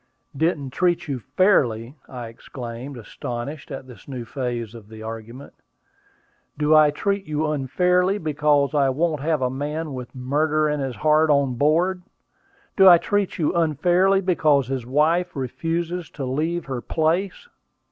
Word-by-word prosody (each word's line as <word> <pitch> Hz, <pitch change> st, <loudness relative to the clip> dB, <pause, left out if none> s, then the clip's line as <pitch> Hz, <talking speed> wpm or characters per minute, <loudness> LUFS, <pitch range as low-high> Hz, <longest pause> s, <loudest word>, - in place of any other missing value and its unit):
"Didn't 145 Hz, -3 st, 0 dB
treat 175 Hz, +2 st, 0 dB
you 135 Hz, -3 st, -3 dB
fairly!" 130 Hz, -, +1 dB, 0.2 s
I 125 Hz, -2 st, -7 dB
exclaimed, 120 Hz, +3 st, -8 dB
astonished 120 Hz, +5 st, -6 dB
at 135 Hz, -2 st, -7 dB
this 125 Hz, -6 st, -14 dB
new 125 Hz, -4 st, -6 dB
phase 120 Hz, -3 st, -4 dB
of 110 Hz, -3 st, -12 dB
the 110 Hz, 0 st, -10 dB
argument. 115 Hz, +4 st, -8 dB, 1.0 s
"Do 150 Hz, +1 st, +2 dB
I 155 Hz, -1 st, +7 dB
treat 200 Hz, +6 st, -1 dB
you 155 Hz, 0 st, -1 dB
unfairly 180 Hz, +7 st, +1 dB
because 150 Hz, -4 st, +1 dB
I 140 Hz, -2 st, +3 dB
won't 155 Hz, +2 st, 0 dB
have 155 Hz, -2 st, 0 dB
a 125 Hz, -, 0 dB
man 150 Hz, +3 st, -4 dB
with 125 Hz, 0 st, -8 dB
murder 150 Hz, +4 st, +1 dB
in 150 Hz, 0 st, -1 dB
his 135 Hz, -3 st, -3 dB
heart 155 Hz, +1 st, +3 dB
on 140 Hz, -3 st, +3 dB
board? 165 Hz, +8 st, +1 dB, 0.7 s
Do 190 Hz, -1 st, +8 dB
I 175 Hz, -, +9 dB
treat 205 Hz, +2 st, -1 dB
you 160 Hz, 0 st, 0 dB
unfairly 175 Hz, +4 st, +2 dB
because 150 Hz, -8 st, +2 dB
his 130 Hz, -3 st, -3 dB
wife 155 Hz, +6 st, +1 dB
refuses 165 Hz, +6 st, -3 dB
to 135 Hz, -, -4 dB
leave 160 Hz, +6 st, -2 dB
her 130 Hz, -3 st, -4 dB
place?" 175 Hz, -, -1 dB
150 Hz, 150 wpm, -23 LUFS, 130-165 Hz, 1.0 s, I